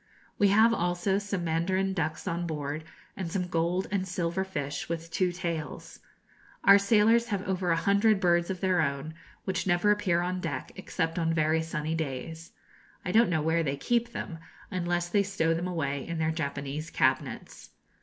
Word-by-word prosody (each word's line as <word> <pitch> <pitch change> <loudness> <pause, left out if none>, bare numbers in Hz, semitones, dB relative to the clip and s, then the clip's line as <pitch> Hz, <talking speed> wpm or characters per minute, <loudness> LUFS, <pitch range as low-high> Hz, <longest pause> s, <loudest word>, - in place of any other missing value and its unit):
We 205 - +5
have 220 +4 +5
also 175 +1 0
some 200 -3 -3
mandarin 185 +4 0
ducks 160 -4 -2
on 170 +1 -1
board, 150 0 -4 0.3
and 180 -4 -4
some 180 0 -1
gold 175 +2 0
and 190 -2 -1
silver 175 0 -1
fish 145 -7 -4
with 165 0 -4
two 185 0 +1
tails. 170 -3 -5 0.6
Our 200 0 +8
sailors 225 +3 +4
have 200 -4 -3
over 185 -1 -1
a 165 - +4
hundred 200 +4 +3
birds 175 -2 +2
of 185 -2 -4
their 185 -3 +3
own, 140 +1 -2 0.3
which 190 -1 -2
never 175 +3 +3
appear 185 -5 +2
on 180 +1 -2
deck, 145 -7 -4
except 170 -3 -2
on 165 0 +1
very 155 0 +2
sunny 160 -1 -3
days. 160 +2 -4 0.5
I 180 - -1
don't 230 +2 +5
know 160 -3 +1
where 160 +1 +2
they 140 -3 -1
can - - -13
keep 235 -1 +2
them, 165 -7 -6 0.3
unless 175 -2 -1
they 200 +3 +2
stow 165 -5 +1
them 170 +2 -2
away 140 -6 -2
in 170 -1 -3
their 160 0 +1
Japanese 145 0 -4
cabinets. - - -1
175 Hz, 180 wpm, -29 LUFS, 160-190 Hz, 0.6 s, Our